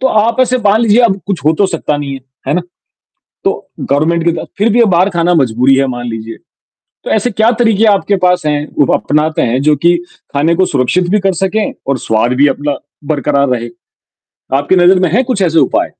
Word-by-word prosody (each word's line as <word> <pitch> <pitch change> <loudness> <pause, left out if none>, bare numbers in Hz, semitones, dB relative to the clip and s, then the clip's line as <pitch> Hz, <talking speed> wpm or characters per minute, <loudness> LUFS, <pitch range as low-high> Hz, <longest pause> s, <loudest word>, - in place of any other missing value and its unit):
तो 265 - +2
आप 225 +3 +1
ऐसे 255 0 +2
मान 210 -1 +2
लीजिए 230 0 +3
अब 200 -4 0
कुछ 190 -7 -3
हो 155 - +4
तो 200 +5 +2
सकता 165 -4 -2
नहीं 145 -1 -5
है। 135 - -8 0.3
है - - +1
ना? 180 - +1 0.8
तो - - -2
गवर्नमेंट 160 +4 0
के 170 - +3
बात, 165 - -5
फिर 210 +3 +2
भी 240 +2 +4
बाहर 185 -1 +2
खाना 175 -1 +1
मजबूरी 130 -2 +2
है 135 0 +2
मान 120 -2 -5
लीजिए। 115 0 -6 0.7
तो - - -6
ऐसे 220 +3 0
क्या 220 +3 +2
तरीके 225 -2 +2
आपके 205 -1 +2
पास 180 -2 +2
हैं, 150 0 -1
वो 145 - +3
अपनाते 155 +1 0
हैं, 125 +2 0
जो 150 +1 +3
कि 170 +5 +2 0.4
खाने 155 +4 +1
को 185 +2 +2
सुरक्षित 150 +5 0
भी 210 +3 +2
कर 195 -1 0
सकें 210 +3 -1
और 140 -1 0
स्वाद 110 +3 +1
भी 145 - +6
अपना 145 +1 -2 0.4
बरकरार 140 0 0
रहे। 120 -2 -2 0.9
आपकी 145 +7 +1
नजर 180 +1 +5
में 180 -3 +1
है 240 +6 +3
कुछ 245 -6 -2
ऐसे 165 -3 +2
उपाय? - - +1
170 Hz, 215 wpm, -13 LUFS, 140-200 Hz, 0.9 s, भी